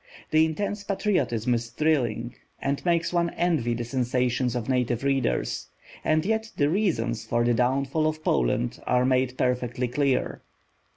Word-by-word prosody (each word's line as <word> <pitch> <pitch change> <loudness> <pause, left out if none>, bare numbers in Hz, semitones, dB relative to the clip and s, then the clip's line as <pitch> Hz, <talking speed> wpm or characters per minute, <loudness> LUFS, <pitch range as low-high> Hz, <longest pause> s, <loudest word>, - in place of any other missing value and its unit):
The 155 0 +5
intense 200 +5 -3
patriotism 180 - 0
is 120 0 -2
thrilling, 130 -5 0 0.3
and 140 0 -2
makes 170 -1 +1
one 170 -1 +2
envy 155 -9 +1
the 120 - -3
sensations 125 0 0
of 120 -2 -3
native 125 -2 0
readers. 135 - 0 0.4
And 155 +1 +2
yet 220 +1 0
the 145 0 +3
reasons 120 - 0
for 120 0 0
the 120 0 +3
downfall 135 +5 +1
of 155 0 -3
Poland 115 - 0
are 125 0 +3
made 130 0 +1
perfectly 125 0 0
clear. 135 +1 0
130 Hz, 150 wpm, -26 LUFS, 120-155 Hz, 0.4 s, The